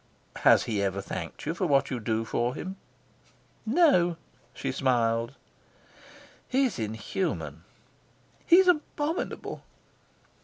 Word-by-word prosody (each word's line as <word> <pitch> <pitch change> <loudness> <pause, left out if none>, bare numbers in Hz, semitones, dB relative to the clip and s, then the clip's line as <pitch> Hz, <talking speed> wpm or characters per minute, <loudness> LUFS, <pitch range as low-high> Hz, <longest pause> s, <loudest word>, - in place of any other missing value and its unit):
"Has - - +5
he 105 -3 -1
ever 100 0 -1
thanked 95 -3 -6
you 155 - -1
for 175 +1 -1
what 140 -2 +2
you 125 - -2
do 110 0 -1
for 120 +2 -1
him?" 190 +2 -6 0.9
"No," 220 - +4 0.3
she 125 - -4
smiled. 120 -2 +1 1.1
"He's 260 - +1
inhuman." 110 - -3 0.8
"He's 365 +2 +7
abominable." 310 -1 -1
135 Hz, 105 wpm, -28 LUFS, -, 1.1 s, He's